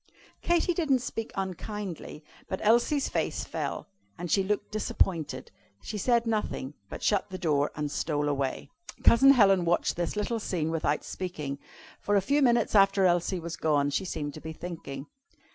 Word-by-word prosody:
Katy 345 +1 +2
didn't 280 -7 +1
speak 225 -2 -4
unkindly, 190 -4 -5 0.2
but 190 - -3
Elsie's 240 +6 +3
face - - -1
fell, - - -4 0.3
and 175 -1 -5
she 195 - +4
looked 205 +2 -2
disappointed. 165 -10 -1 0.3
She 210 - -5
said 235 +1 +2
nothing, 210 -11 -2
however, - - -28
but - - -7
shut 205 -1 +1
the 185 - -5
door 150 -5 +1
and 150 -1 -3
stole 145 -1 -1
away. 140 - -2 0.3
Cousin 270 +4 +7
Helen 195 -7 +5
watched 170 0 +1
this 175 +2 -2
little 215 +2 -1
scene 165 -6 -2
without 155 -2 0
speaking. 150 -7 -5 0.4
For 205 - 0
a 200 - +4
few 285 +2 +3
minutes 240 -4 +3
after 195 -1 +5
Elsie 175 +1 +2
was 170 0 -5
gone 145 -3 +1
she 190 - -1
seemed 145 -5 -4
to 155 - -9
be 160 0 -6
thinking. 160 -5 -7
185 Hz, 170 wpm, -28 LUFS, 155-215 Hz, 0.4 s, Cousin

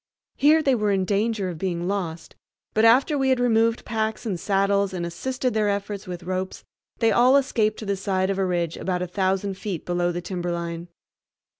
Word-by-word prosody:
Here 310 +3 +4
they 275 - +3
were 210 -4 +1
in 190 -1 +1
danger 205 0 0
of 170 -3 -7
being 175 -1 -2
lost, 175 -5 -4 0.4
but 220 - +2
after 270 +6 +4
we 265 0 +2
had 260 -1 +3
removed 230 -1 +2
packs 220 0 -2
and 195 -6 -2
saddles 200 +1 +1
and 170 -1 -3
assisted 255 +8 -2
their 215 -1 +1
efforts 200 -1 -3
with 180 -1 -6
ropes, 185 +1 -4 0.3
they 225 -1 +3
all 255 +3 +5
escaped 220 -6 +1
to 220 - -7
the 200 0 0
side 190 0 0
of 195 - -2
a 190 - +2
ridge 170 -2 -1
about 180 -1 -2
a - - -3
thousand 190 +1 -1
feet 195 -7 -4
below 175 0 0
the 175 - -3
timberline. 170 -1 -4
200 Hz, 195 wpm, -24 LUFS, 180-225 Hz, 0.4 s, all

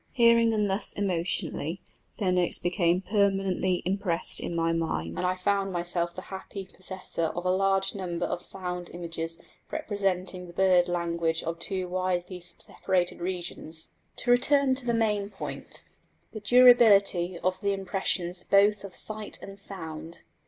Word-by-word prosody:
Hearing 235 -2 +5
them 215 -2 +1
thus 195 +1 +1
emotionally 175 -3 -1 0.4
their 195 -5 +1
notes 180 -1 +3
became 175 0 +1
permanently 195 -2 +1
impressed 185 -2 +3
on 170 - -3
my 165 0 +1
mind, 85 - -2
and - - +3
I 185 - +1
found 195 +1 0
myself 175 -1 -2
the 185 - -7
happy 190 +1 -7
possessor 185 -3 -4
of 175 +2 -4
a 180 - +3
large 195 0 +1
number 180 -4 -3
of 175 - -3
sound 180 -2 -3
images 165 -1 -5 0.3
representing 185 -3 -2
the 175 - -12
bird 185 -1 +4
language 170 -2 -1
of 165 0 -4
two 185 +1 -2
widely 185 0 -2
separated 180 +1 -2
regions. 175 -3 -4 0.3
To 245 - +1
return 275 +2 +4
to 260 -1 0
the 235 - +2
main 210 -3 +1
point 195 - -7 0.5
the 215 - -6
durability 210 -6 +5
of 185 +2 -2
the 200 0 +1
impressions 185 -2 -1
both 200 +1 +3
of 195 -2 -9
sight 215 -1 -3
and 195 0 -10
sound. 165 -4 -7
185 Hz, 150 wpm, -27 LUFS, 175-200 Hz, 0.5 s, Hearing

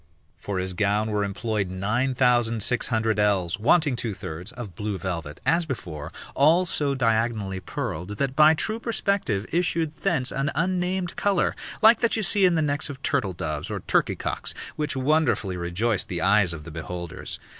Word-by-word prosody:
For 100 -2 -5
his 95 0 -1
gown 105 +3 +1
were 105 -1 0
employed 100 0 -2
nine 110 +8 0
thousand 120 -4 +2
six 125 +2 +1
hundred 110 -3 0
ells, 100 -3 +1
wanting 145 +4 +3
two 115 -4 -3
thirds, 85 +6 -6
of 120 -7 -8
blue 105 +2 -3
velvet, 85 -6 -4
as 165 0 +2
before, 80 - -5 0.2
all 160 +6 +4
so 145 -5 +1
diagonally 110 -5 0
purled, 90 +2 -5
that 135 +1 -1
by 155 +1 +7
true 220 +8 -2
perspective 200 - -1
issued 165 -2 +1
thence 155 -5 -1
an 135 +1 -1
unnamed 180 +1 -1
colour, 200 -3 +1 0.3
like 225 +2 +7
that 235 - +2
you 220 - -1
see 195 +1 +4
in 180 -2 +4
the 160 - +2
necks 145 +1 0
of 135 -1 -8
turtle 130 - 0
doves 75 -4 -4
or - - -4
turkey - - +1
cocks, - - -4 0.2
which 150 -1 -2
wonderfully 130 - +1
rejoiced 90 +6 -1
the 85 -2 -3
eyes 95 -1 +4
of 80 -2 -6
the 85 - -9
beholders. 85 +2 -6
115 Hz, 175 wpm, -25 LUFS, 95-155 Hz, 0.3 s, by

